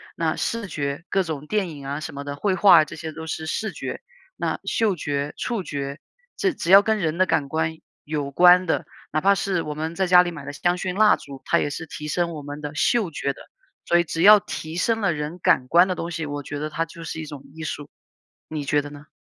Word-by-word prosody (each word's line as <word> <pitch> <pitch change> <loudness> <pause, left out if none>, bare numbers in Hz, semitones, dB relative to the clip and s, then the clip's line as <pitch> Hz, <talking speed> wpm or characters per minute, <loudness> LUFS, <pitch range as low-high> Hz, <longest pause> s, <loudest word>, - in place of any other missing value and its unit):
那 160 -1 0
视 230 -3 -2
觉， 145 -1 -4
各 195 - +2
种 150 -3 -5
电 205 -2 0
影 145 -4 -9
啊 140 +2 -3
什 160 - -6
么 140 0 -7
的， 145 0 -4
绘 190 +6 0
画 185 -4 +7
啊 - - 0
这 - - -9
些 160 -1 -5
都 160 +1 -7
是 160 0 -4
视 215 +7 -2
觉， - - -6 0.4
那 - - -1
嗅 215 -4 +1
觉、 145 -2 -3
触 230 -5 -2
觉， 140 -3 -5 0.4
这 380 -3 +1
只 170 - -5
要 195 +1 +10
跟 220 +1 +1
人 165 -3 -1
的 185 - +4
感 150 -6 0
官 160 +1 -1 0.3
有 145 -2 -3
关 180 +4 +6
的， 165 - 0 0.3
哪 155 - +1
怕 200 +5 +4
是 190 -2 -1
我 150 - -4
们 160 +2 -4
在 190 +1 0
家 180 0 +7
里 175 - -3
买 150 -4 -9
的 145 - -6
香 175 +5 0
薰 180 0 -3
蜡 215 0 +6
烛， 135 -2 -11
它 - - +3
也 - - 0
是 155 +3 -5
提 150 -1 -7
升 170 +3 0
我 155 - -6
们 145 +1 -7
的 145 0 -5
嗅 200 +3 +2
觉 140 -2 -2
的， - - -15 0.4
所 175 - +4
以 - - +3
只 165 0 -3
要 210 +3 +9
提 160 -4 -6
升 225 +4 +1
了 195 -3 +2
人 150 +3 -4
感 125 -6 +3
官 175 +6 +5
的 - - +1
东 170 - -4
西， 160 -1 -3
我 145 0 -4
觉 145 - -6
得 155 +1 -3
它 160 +2 -2
就 165 0 -11
是 160 0 -5
一 160 - -5
种 145 -2 -9
艺 160 0 -8
术， 145 -2 -5 0.6
你 155 -2 -4
觉 145 +1 +1
得 145 - -8
呢？ 145 0 -12
160 Hz, 275 characters per minute, -23 LUFS, 145-180 Hz, 0.6 s, 要